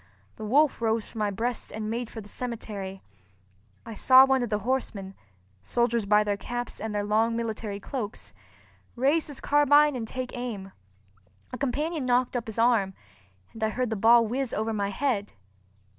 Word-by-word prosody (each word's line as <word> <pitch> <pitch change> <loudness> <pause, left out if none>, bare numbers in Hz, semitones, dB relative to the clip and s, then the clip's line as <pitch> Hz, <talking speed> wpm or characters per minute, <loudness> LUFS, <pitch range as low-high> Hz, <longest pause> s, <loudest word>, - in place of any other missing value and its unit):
The 215 - -6
wolf 280 +4 +3
rose 225 -1 0
from 225 - -8
my 210 -1 +1
breast 230 +4 -3
and 215 0 -4
made 230 +1 -3
for 225 - -8
the 205 - -13
cemetery. 205 -5 -6 0.8
I 230 - -7
saw 260 +4 +7
one 265 -1 +2
of 240 - -2
the 210 - +1
horsemen 215 -7 -2 0.5
(soldiers 235 - 0
by 210 +1 +5
their 205 -1 -1
caps 240 +3 -5
and 220 -1 -4
their 205 - 0
long 220 +2 +2
military 220 -3 -3
cloaks) 205 - -6 0.6
raise 280 +6 +2
his 290 -3 -8
carbine 290 0 +4
and 230 -3 -4
take 255 +2 -5
aim. 220 -6 -5 0.8
A - - -3
companion 290 +2 -1
knocked 245 +1 +2
up 240 -2 -2
his 220 - -6
arm, 225 -5 +2 0.6
and 225 - -6
I 220 - +2
heard 250 +1 -2
the - - 0
ball 230 +3 +6
whiz 255 +3 -2
over 220 +1 -1
my 200 -2 -1
head. 210 -2 -1
230 Hz, 175 wpm, -27 LUFS, 210-255 Hz, 0.8 s, saw